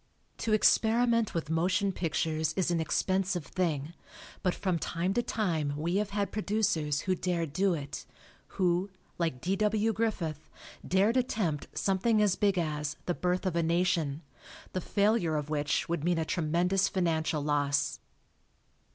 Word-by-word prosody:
To 225 Hz, -, -1 dB
experiment 230 Hz, +1 st, +3 dB
with 160 Hz, -2 st, -2 dB
motion 185 Hz, +5 st, +1 dB
pictures 160 Hz, -2 st, -1 dB
is 185 Hz, -2 st, +1 dB
an 170 Hz, -, +1 dB
expensive 185 Hz, +1 st, 0 dB
thing, 160 Hz, -4 st, -2 dB, 0.5 s
but 180 Hz, -, 0 dB
from 185 Hz, -4 st, -1 dB
time 175 Hz, +4 st, -1 dB
to 240 Hz, -, +2 dB
time 165 Hz, -12 st, -1 dB
we 170 Hz, +5 st, 0 dB
have 210 Hz, 0 st, 0 dB
had 200 Hz, 0 st, -2 dB
producers 195 Hz, -9 st, 0 dB
who 185 Hz, -, 0 dB
dared 170 Hz, -4 st, -2 dB
do 190 Hz, +1 st, +2 dB
it; 140 Hz, -2 st, -7 dB, 0.5 s
who, 180 Hz, +1 st, +2 dB, 0.3 s
like 160 Hz, -7 st, -1 dB
D. 190 Hz, +2 st, 0 dB
W. 215 Hz, +1 st, +2 dB
Griffith, 175 Hz, -9 st, -2 dB, 0.3 s
dared 200 Hz, +7 st, +2 dB
attempt 210 Hz, -, -1 dB
something 205 Hz, +3 st, +2 dB
as 205 Hz, -3 st, +3 dB
big 200 Hz, -2 st, +2 dB
as 150 Hz, -3 st, -1 dB
"The 175 Hz, -, 0 dB
Birth 180 Hz, +2 st, -1 dB
of 185 Hz, -3 st, 0 dB
a 170 Hz, -, +2 dB
Nation," 165 Hz, -3 st, 0 dB, 0.5 s
the 185 Hz, -, -1 dB
failure 200 Hz, -4 st, +1 dB
of 150 Hz, 0 st, -3 dB
which 145 Hz, -1 st, 0 dB
would 170 Hz, -3 st, -2 dB
mean 175 Hz, 0 st, +2 dB
a 160 Hz, -, 0 dB
tremendous 180 Hz, +3 st, +1 dB
financial 160 Hz, -5 st, 0 dB
loss. 145 Hz, -2 st, 0 dB
175 Hz, 150 wpm, -30 LUFS, 155-200 Hz, 0.5 s, experiment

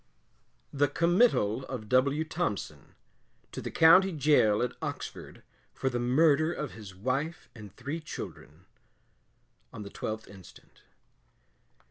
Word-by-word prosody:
THE 145 Hz, 0 st, +2 dB
COMMITTAL 170 Hz, -, +2 dB
OF 125 Hz, -5 st, -7 dB
W. 140 Hz, +6 st, +2 dB
THOMPSON, 105 Hz, -, -4 dB, 0.6 s
To -, -, -6 dB
the -, -, -5 dB
County 185 Hz, +4 st, +6 dB
Gaol 140 Hz, -, +3 dB
at 125 Hz, -, -1 dB
Oxford -, -, -7 dB, 0.3 s
for 130 Hz, -, -1 dB
the 120 Hz, -, -2 dB
MURDER 150 Hz, +5 st, +3 dB
OF 150 Hz, -5 st, -5 dB
HIS 105 Hz, -4 st, -11 dB
WIFE 135 Hz, -, -3 dB
AND 105 Hz, -4 st, -12 dB
THREE 140 Hz, +8 st, -5 dB
CHILDREN, 155 Hz, -, -9 dB, 1.1 s
On 110 Hz, -, -8 dB
the 100 Hz, -, -10 dB
12th 110 Hz, 0 st, -5 dB
instant. 95 Hz, -3 st, -16 dB
130 Hz, 120 wpm, -29 LUFS, 110-155 Hz, 1.1 s, County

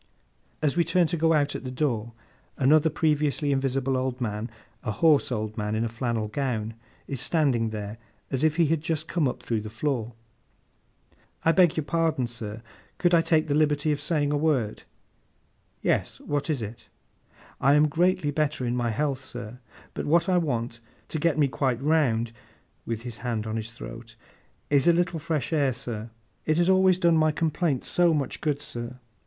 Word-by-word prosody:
As 150 Hz, -2 st, +2 dB
we 170 Hz, -, +4 dB
turn 170 Hz, +2 st, +3 dB
to 170 Hz, -, -1 dB
go 165 Hz, 0 st, +3 dB
out 145 Hz, -2 st, +2 dB
at -, -, -5 dB
the 130 Hz, -, -4 dB
door, 120 Hz, -4 st, -1 dB, 0.4 s
another 150 Hz, +4 st, +4 dB
previously 150 Hz, -1 st, +1 dB
invisible 135 Hz, -1 st, 0 dB
old 130 Hz, 0 st, -1 dB
man, 110 Hz, -1 st, -3 dB, 0.3 s
a -, -, -4 dB
hoarse 145 Hz, +6 st, +3 dB
old 110 Hz, -2 st, -2 dB
man 105 Hz, +1 st, -1 dB
in 110 Hz, -, 0 dB
a -, -, -2 dB
flannel 115 Hz, -1 st, -2 dB
gown, 115 Hz, -2 st, -2 dB, 0.3 s
is 135 Hz, -3 st, -4 dB
standing 130 Hz, -9 st, +2 dB
there, 105 Hz, 0 st, -6 dB, 0.3 s
as 135 Hz, +2 st, -1 dB
if 155 Hz, -1 st, +3 dB
he 170 Hz, -1 st, +4 dB
had 160 Hz, 0 st, +1 dB
just 160 Hz, 0 st, -2 dB
come 165 Hz, -5 st, +1 dB
up 125 Hz, -, -4 dB
through 115 Hz, -2 st, -1 dB
the 110 Hz, -, -7 dB
floor. 120 Hz, -1 st, -2 dB, 1.3 s
'I 165 Hz, -, +6 dB
beg 175 Hz, -2 st, +4 dB
your 155 Hz, -, +1 dB
pardon, 160 Hz, -4 st, +1 dB
sir, 115 Hz, -2 st, -6 dB, 0.3 s
could 175 Hz, -1 st, +2 dB
I 170 Hz, -, +6 dB
take 160 Hz, -1 st, +2 dB
the 145 Hz, -, 0 dB
liberty 150 Hz, 0 st, +2 dB
of 145 Hz, -, -1 dB
saying 145 Hz, -4 st, 0 dB
a 145 Hz, -, +1 dB
word?' 145 Hz, -9 st, 0 dB, 1.0 s
'Yes; -, -, 0 dB
what 145 Hz, +2 st, -2 dB
is 140 Hz, -7 st, 0 dB
it?' 115 Hz, +3 st, -9 dB, 0.7 s
'I 140 Hz, +2 st, +4 dB
am 150 Hz, +1 st, +5 dB
greatly 165 Hz, -1 st, +1 dB
better 145 Hz, -3 st, 0 dB
in 120 Hz, 0 st, 0 dB
my 120 Hz, -1 st, 0 dB
health, 135 Hz, +4 st, -1 dB
sir; 115 Hz, -1 st, -8 dB, 0.3 s
but -, -, -4 dB
what 170 Hz, +2 st, +3 dB
I 180 Hz, -1 st, +3 dB
want, 120 Hz, -7 st, -2 dB, 0.3 s
to 155 Hz, -, -2 dB
get 160 Hz, 0 st, +2 dB
me 145 Hz, -2 st, +4 dB
quite 130 Hz, -2 st, 0 dB
round,' 130 Hz, -6 st, +2 dB, 0.6 s
with 115 Hz, -1 st, -3 dB
his 120 Hz, -2 st, -6 dB
hand 115 Hz, -3 st, -3 dB
on 110 Hz, 0 st, -3 dB
his 110 Hz, 0 st, -4 dB
throat, -, -, -10 dB, 0.6 s
'is 140 Hz, 0 st, +4 dB
a 170 Hz, -, +7 dB
little 175 Hz, -1 st, 0 dB
fresh 155 Hz, -2 st, -2 dB
air, 140 Hz, -4 st, +2 dB
sir. 115 Hz, -3 st, -5 dB, 0.4 s
It 155 Hz, 0 st, +2 dB
has 175 Hz, +2 st, +4 dB
always 185 Hz, -1 st, +5 dB
done 170 Hz, -3 st, +4 dB
my 155 Hz, 0 st, +4 dB
complaint 155 Hz, -3 st, 0 dB
so 175 Hz, -2 st, +3 dB
much 140 Hz, -3 st, -2 dB
good, 145 Hz, -2 st, -1 dB
sir. 120 Hz, 0 st, -6 dB
140 Hz, 190 wpm, -26 LUFS, 120-155 Hz, 1.3 s, a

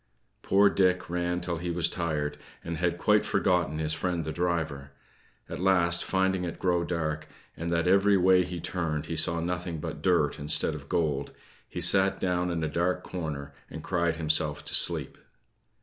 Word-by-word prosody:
Poor 100 Hz, +1 st, +4 dB
Dick 90 Hz, -3 st, +1 dB
ran 90 Hz, 0 st, -1 dB
till 85 Hz, -1 st, -2 dB
he 90 Hz, +1 st, -4 dB
was 85 Hz, 0 st, +1 dB
tired, 75 Hz, -4 st, -3 dB, 0.2 s
and 85 Hz, -1 st, -4 dB
had 85 Hz, 0 st, 0 dB
quite 105 Hz, +3 st, +3 dB
forgotten 90 Hz, -6 st, 0 dB
his 80 Hz, 0 st, -1 dB
friend 85 Hz, -1 st, -2 dB
the 80 Hz, -, -3 dB
driver. 80 Hz, -5 st, -2 dB, 0.5 s
At -, -, -6 dB
last, 90 Hz, -2 st, +2 dB
finding 95 Hz, -1 st, 0 dB
it 85 Hz, -2 st, -5 dB
grow 90 Hz, -2 st, +1 dB
dark, 80 Hz, -3 st, -3 dB, 0.3 s
and 85 Hz, +1 st, -4 dB
that 85 Hz, 0 st, +1 dB
every 100 Hz, +2 st, +4 dB
way 90 Hz, 0 st, +4 dB
he 90 Hz, -1 st, -6 dB
turned 80 Hz, -4 st, -3 dB
he 80 Hz, -, -4 dB
saw 85 Hz, +1 st, +3 dB
nothing 85 Hz, -1 st, -3 dB
but -, -, -6 dB
dirt -, -, +1 dB
instead 75 Hz, +2 st, +3 dB
of 70 Hz, -2 st, -9 dB
gold, 75 Hz, -4 st, -1 dB, 0.4 s
he -, -, -5 dB
sat 95 Hz, 0 st, +4 dB
down 90 Hz, -1 st, 0 dB
in 85 Hz, -2 st, -2 dB
a -, -, 0 dB
dark 85 Hz, +4 st, -1 dB
corner, 75 Hz, -5 st, -6 dB, 0.2 s
and 80 Hz, -, -8 dB
cried 85 Hz, -3 st, 0 dB
himself 75 Hz, -2 st, 0 dB
to -, -, -5 dB
sleep. -, -, +1 dB
85 Hz, 180 wpm, -28 LUFS, 80-90 Hz, 0.5 s, Poor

